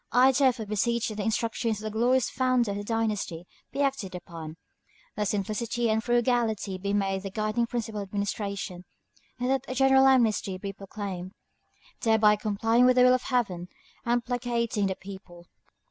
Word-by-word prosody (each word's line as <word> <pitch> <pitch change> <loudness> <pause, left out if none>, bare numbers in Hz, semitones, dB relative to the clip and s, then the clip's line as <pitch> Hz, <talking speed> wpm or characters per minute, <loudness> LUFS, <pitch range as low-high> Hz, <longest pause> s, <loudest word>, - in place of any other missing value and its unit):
I, 255 +2 +6
therefore, 260 -4 +2
beseech 230 +3 0
that 215 - -6
the 210 - -2
instructions 225 +1 -1
of 210 - -9
the 215 0 -5
glorious 245 +2 +3
founder 255 -4 +1
of 200 - -3
the 205 - -4
dynasty 210 -6 -2 0.3
be 285 - 0
acted 265 -10 -2
upon; 165 -3 -8 0.6
that 210 0 -1
simplicity 220 +3 -1
and 220 0 +1
frugality 235 -5 +1
be 200 +1 -2
made 195 -1 0
the 195 - -5
guiding 215 +4 -1
principle 225 -3 -3
of 200 - -6
administration; 200 -2 -3 0.5
and 250 +1 0
that 270 -1 +1
a 255 - -4
general 265 0 +5
amnesty 225 -7 +2
be 195 +1 -6
proclaimed, 195 -2 -6 0.7
thereby 220 -2 +4
complying 225 +3 +2
with 255 - +5
the 250 - +6
will 250 0 +6
of 255 - +2
Heaven 200 -10 -1 0.4
and 240 0 0
placating 235 -4 -1
the 190 - -2
people. 190 -3 -11
220 Hz, 170 wpm, -27 LUFS, 200-240 Hz, 0.7 s, I